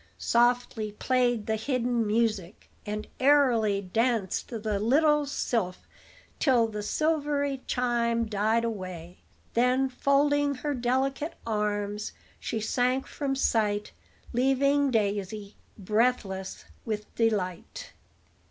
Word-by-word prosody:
Softly 240 -3 +1
played 245 -1 +1
the 220 - 0
hidden 240 -1 0
music, 215 -4 -1 0.2
and 210 0 -3
airily 245 -8 +4
danced 220 +1 0
the 215 -3 -2
little 295 +6 +3
sylph 220 -9 -2 0.5
till 250 -6 +4
the 210 -1 -5
silvery 285 +1 0
chime 235 -2 +1
died 215 +2 +1
away; 185 -6 -6 0.3
then, 250 +3 +2
folding 285 +2 +2
her 290 +3 -3
delicate 265 +4 -1
arms, 210 -1 -2 0.3
she 225 - -3
sank 250 +4 0
from 275 -2 -3
sight, 210 -5 0 0.4
leaving 275 +3 +2
Daisy 205 -2 -1 0.2
breathless 210 -2 -1 0.2
with 215 -2 -5
delight. 225 - -2
235 Hz, 100 wpm, -28 LUFS, 210-265 Hz, 0.5 s, airily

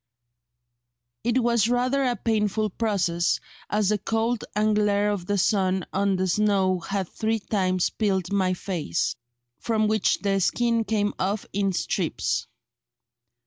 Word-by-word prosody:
It 240 +1 +1
was 235 -2 +3
rather 250 +3 +1
a 250 -2 +1
painful 215 -1 0
process, 180 -6 0 0.3
as 210 -2 +1
the 210 -1 +1
cold 225 +2 -1
and 210 0 +2
glare 205 0 +2
of 185 -4 -4
the 205 - +1
sun 190 -1 +1
on 195 0 +1
the 185 0 0
snow 190 -1 +2
had 195 +1 -3
three 225 +4 -1
times 185 -4 0
peeled 190 -4 -1
my 185 -2 +2
face, 170 - -2 0.4
from 220 -2 +1
which 215 0 +2
the 195 -1 +1
skin 230 +3 +1
came 205 -2 0
off 195 +2 -1
in 195 0 +1
strips." 180 - -1
205 Hz, 140 wpm, -25 LUFS, 190-220 Hz, 0.4 s, was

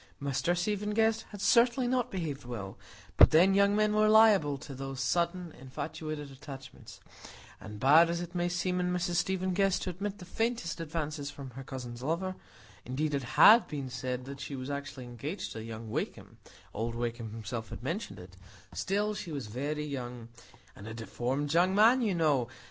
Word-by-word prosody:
Mr 140 +5 0
Stephen 210 +3 -1
Guest 225 0 +2
had 205 -2 -9
certainly 240 +3 +4
not 250 -1 +1
behaved 160 - -4
well; 110 -6 -6 0.4
but - - +9
then, 180 +5 +5
young 200 +1 +4
men 215 0 +2
were 215 0 +4
liable 210 -10 +6
to 135 +1 -9
those 135 0 -6
sudden 170 +5 0
infatuated 145 +2 -6
attachments; 135 0 -11 0.6
and 105 -1 -9
bad 155 +7 +6
as 170 0 -1
it 175 0 -6
might 175 -1 0
seem 180 +1 0
in 180 0 0
Mrs 175 -1 0
Stephen 185 +1 0
Guest 195 0 +2
to 185 - -2
admit 200 +3 -4
the 180 - -10
faintest 225 -3 -2
advances 155 -3 -3
from 140 -2 -9
her 135 +3 -8
cousin's 125 -3 -7
lover 170 +7 -2 0.5
(indeed 145 +5 -2
it 140 - 0 0.2
had 220 +9 +8
been 140 -3 -5
said 125 0 -4
that 140 0 -8
she 140 - -5
was 130 +1 -5
actually 140 -2 -5
engaged 125 - -5
to 110 - -6
young 110 -1 -7
Wakem,—old 115 +1 -6
Wakem 120 -1 -3
himself 115 +1 -6
had - - -8
mentioned 170 - -4
it), 90 +1 -12 0.4
still, 205 +2 0
she 180 -5 -6
was 140 -5 -4
very 145 +7 -3
young,—"and 120 -6 -9
a 110 - -6
deformed 130 +6 -2
young 180 +3 +3
man, 230 +5 +6
you 210 -6 +1
know! 145 -7 +2
150 Hz, 175 wpm, -30 LUFS, 130-185 Hz, 0.6 s, but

